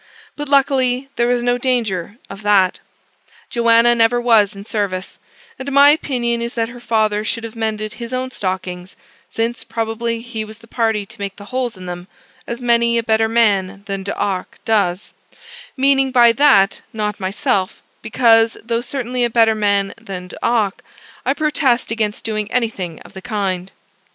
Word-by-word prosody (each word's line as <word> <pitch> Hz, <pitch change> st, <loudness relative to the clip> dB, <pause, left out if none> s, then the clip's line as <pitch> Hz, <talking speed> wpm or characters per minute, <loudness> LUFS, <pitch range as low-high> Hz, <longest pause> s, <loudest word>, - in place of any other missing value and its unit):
But, 295 Hz, -1 st, -6 dB
luckily, 270 Hz, -2 st, +2 dB
there 235 Hz, -, +1 dB
was 245 Hz, 0 st, +1 dB
no 245 Hz, 0 st, +1 dB
danger 225 Hz, -6 st, -1 dB
of 195 Hz, +1 st, -10 dB
that: 200 Hz, -3 st, +3 dB, 0.7 s
Joanna 235 Hz, 0 st, +4 dB
never 235 Hz, +1 st, +3 dB
was 220 Hz, -4 st, +3 dB
in 200 Hz, 0 st, -9 dB
service; 200 Hz, -4 st, -3 dB, 0.4 s
and 270 Hz, +2 st, -5 dB
my 280 Hz, +1 st, +7 dB
opinion 240 Hz, -6 st, 0 dB
is 235 Hz, +1 st, -4 dB
that 230 Hz, -1 st, -1 dB
her 245 Hz, +1 st, -10 dB
father 215 Hz, -3 st, +1 dB
should 230 Hz, +1 st, -3 dB
have 230 Hz, 0 st, -7 dB
mended 215 Hz, -1 st, -3 dB
his 235 Hz, 0 st, -8 dB
own 255 Hz, 0 st, -3 dB
stockings, 185 Hz, -3 st, -4 dB, 0.3 s
since 230 Hz, +2 st, -2 dB
probably 230 Hz, 0 st, -3 dB
he 230 Hz, -2 st, -5 dB
was 215 Hz, 0 st, -10 dB
the 230 Hz, -, -18 dB
party 225 Hz, -3 st, 0 dB
to -, -, -12 dB
make 200 Hz, -1 st, -4 dB
the 205 Hz, -, -12 dB
holes 250 Hz, -5 st, -2 dB
in 185 Hz, -, -10 dB
them, 175 Hz, 0 st, -7 dB, 0.4 s
as 235 Hz, -, -4 dB
many 235 Hz, -1 st, +3 dB
a 230 Hz, -, 0 dB
better 220 Hz, 0 st, +2 dB
man 200 Hz, -4 st, +1 dB
than 195 Hz, -1 st, -4 dB
D'Arc 195 Hz, -1 st, -3 dB
does; 200 Hz, -4 st, 0 dB, 0.6 s
meaning 270 Hz, 0 st, +3 dB
by 240 Hz, -2 st, +6 dB
that 230 Hz, -6 st, +4 dB
not 210 Hz, -2 st, -3 dB
myself, 190 Hz, 0 st, -1 dB, 0.2 s
because, 225 Hz, -1 st, +3 dB
though 230 Hz, 0 st, -1 dB
certainly 250 Hz, -1 st, -2 dB
a 240 Hz, -, +2 dB
better 225 Hz, -1 st, +4 dB
man 200 Hz, -2 st, +1 dB
than 180 Hz, -2 st, -7 dB
D'Arc, 215 Hz, -1 st, -1 dB, 0.5 s
I 270 Hz, -, +2 dB
protest 285 Hz, -6 st, +1 dB
against 215 Hz, -2 st, -2 dB
doing 215 Hz, -1 st, -2 dB
anything 200 Hz, -9 st, -2 dB
of -, -, -15 dB
the 190 Hz, -, -9 dB
kind. 195 Hz, -5 st, -3 dB
225 Hz, 165 wpm, -19 LUFS, 200-240 Hz, 0.7 s, my